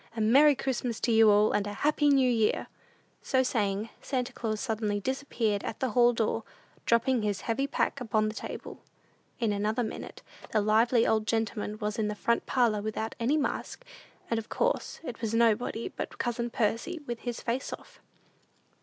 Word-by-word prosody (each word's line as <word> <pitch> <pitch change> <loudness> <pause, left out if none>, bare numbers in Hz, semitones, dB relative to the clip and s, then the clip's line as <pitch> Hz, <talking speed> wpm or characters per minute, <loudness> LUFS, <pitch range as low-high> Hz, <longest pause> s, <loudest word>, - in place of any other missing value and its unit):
A - - -1
Merry 275 +7 +6
Christmas 250 -3 -2
to 235 - +1
you 225 -1 +6
all, 210 +1 +5
and 205 0 0
a 205 - -4
Happy 295 +5 +2
New 270 -2 +4
Year." 225 -3 +1 0.6
So 260 -2 +2
saying, 210 -3 -1
Santa 250 -3 -2
Claus 215 -2 -3
suddenly 215 -4 -1
disappeared 230 -4 -1
at 220 - -5
the 260 -3 -1
hall 240 +2 +5
door, 225 -1 -1 0.4
dropping 235 +1 +3
his 205 -3 -1
heavy 260 +4 -1
pack 280 -1 -1
upon 215 -2 +1
the 215 - -3
table. - - -7 0.6
In 225 -4 +1
another 215 +4 0
minute 220 - -7 0.3
the 215 - +2
lively 225 +3 +3
old 220 -1 +1
gentleman 220 -2 -1
was 210 +2 -3
in 215 - +1
the 210 - -3
front 235 +3 0
parlor 235 -5 +2
without 220 +1 -3
any 255 +6 +2
mask, 310 - -3 0.4
and 230 - 0
of 220 - -9
course - - -1
it 245 -7 -7
was 225 -1 -1
nobody 230 0 +1
but - - -6
cousin 240 0 -2
Percy 230 +10 -1
"with 240 -2 -4
his 240 -2 -4
face 245 +3 -3
off." - - -10
230 Hz, 180 wpm, -29 LUFS, 215-250 Hz, 0.6 s, Merry